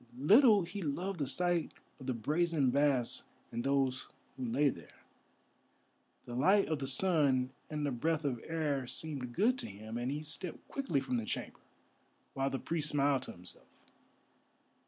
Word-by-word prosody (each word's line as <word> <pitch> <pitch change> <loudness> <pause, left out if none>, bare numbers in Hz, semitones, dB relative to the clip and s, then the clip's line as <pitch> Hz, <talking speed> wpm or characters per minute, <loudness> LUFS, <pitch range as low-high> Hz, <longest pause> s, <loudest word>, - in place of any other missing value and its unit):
Little 210 - +6
he 200 +4 -6
loved 180 +4 -2
the 140 - 0
sight 175 +3 0 0.3
of 130 - -9
the 130 - 0
brazen 150 +2 +1
baths 140 -3 +2 0.3
and 120 0 -3
those 135 -1 +1 0.3
who 130 - -6
lay 130 +5 +2
there. 85 - -10 1.2
The 120 - -7
light 190 +11 +4
of 155 -2 0
the 135 - -3
sun 135 -4 +2 0.2
and 150 -1 -2
the 145 - 0
breath 155 +5 0
of 125 -5 -1
air 150 -5 -1
seemed 135 -4 -3
good 250 +5 +3
to - - -3
him, 110 +3 -7
and 125 +2 -1
he 150 +2 -3
stepped 165 +3 -4
quickly 270 - -1
from 130 -2 -1
the 115 - -2
chamber, - - -4 0.7
while 135 0 0
the 135 - -2
priest 155 +1 -2
smiled 140 -2 +2
to - - -8
himself. 90 +1 -10
140 Hz, 165 wpm, -33 LUFS, 130-165 Hz, 1.2 s, Little